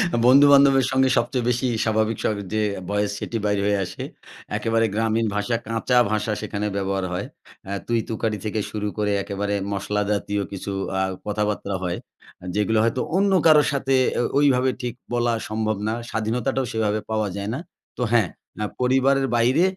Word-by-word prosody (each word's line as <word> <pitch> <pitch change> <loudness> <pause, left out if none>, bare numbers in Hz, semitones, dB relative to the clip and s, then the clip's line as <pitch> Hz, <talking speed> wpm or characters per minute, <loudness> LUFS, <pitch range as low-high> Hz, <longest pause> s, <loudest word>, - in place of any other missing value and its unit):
আ - - +1
বন্ধু-বান্ধবের 140 0 +7
সঙ্গে 130 0 +3
সবচেয়ে 120 0 0
বেশি 125 +2 +1 0.2
স্বাভাবিক 110 0 +1
স্বর 110 - +1 0.2
যে 110 - +1 0.3
voice 105 0 0
সেটি 115 - -3
বের 105 -1 +1
হয়ে 100 0 +2
আসে। 90 - -7 0.5
একেবারে 115 0 +1
গ্রামীণ 110 +1 +1
ভাষা, 105 +3 0
কাঁচা 115 +2 +1
ভাষা 105 0 0
সেখানে 105 0 -3
ব্যবহার 95 -1 -1
হয়। 90 - -2 0.4
আ - - -4 0.2
তুই-তুকারি 110 -2 -1
থেকে 110 0 -1
শুরু 105 -1 -3
করে 105 -1 0
একেবারে 100 0 -3 0.2
মশলা 105 +1 -1
জাতীয় 100 0 -1
কিছু 100 0 -5 0.3
আ - - +2 0.2
কথাবার্তা 105 -1 -2
হয়। 90 -1 -2 0.6
যেগুলো 105 +2 +1
হয়তো 115 +2 +1 0.2
অন্য 200 0 +3
কারো 155 -2 +7
সাথে 135 -1 +1 0.2
এ - - +3 0.2
ওইভাবে 130 -3 +4
ঠিক 120 -2 -3 0.2
বলা 120 -1 +1 0.2
সম্ভব 110 0 -1
না। 110 - 0 0.2
স্বাধীনতাটাও 125 +4 -1
সেভাবে 110 -1 0
পাওয়া 110 -1 0
যায় 100 +1 -4
না। 130 - -3 0.4
তো - - -4
হ্যাঁ, 115 -7 +3 0.3
না 105 - -3 0.2
পরিবারের 135 +2 +3
বাইরে 125 +8 +3
110 Hz, 165 wpm, -23 LUFS, 105-125 Hz, 0.6 s, বন্ধু-বান্ধবের